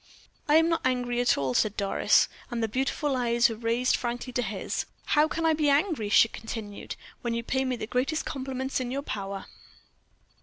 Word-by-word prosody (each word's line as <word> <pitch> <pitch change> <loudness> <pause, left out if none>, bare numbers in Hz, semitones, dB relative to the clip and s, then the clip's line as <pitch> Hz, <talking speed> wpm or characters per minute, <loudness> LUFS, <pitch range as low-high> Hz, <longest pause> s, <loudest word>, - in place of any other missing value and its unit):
"I 300 - +5
am 325 +1 +6
not 330 -1 +1
angry 245 -1 0
at 245 - +3
all," 135 -2 -1
said 210 - +1
Doris, 200 -1 +3 0.2
and 240 -3 -2
the - - +2
beautiful 270 +4 -1
eyes 240 -1 +3
were 225 - -4
raised 230 +3 +1
frankly 245 +1 -4
to 245 - +1
his. 205 -4 -3 0.2
"How 300 0 +4
can 330 +1 -2
I 320 - +4
be 305 -1 +2
angry," 285 - +1
she 215 - +6
continued, 220 -2 -7 0.3
"when 235 -1 -2
you 235 - -2
pay 265 +3 0
me 255 -1 0
the 225 - -5
greatest 255 +7 -1
compliments 265 0 -3
in 255 -1 -3
your 275 +3 -3
power." 195 -5 -5
245 Hz, 195 wpm, -27 LUFS, 225-270 Hz, 0.3 s, am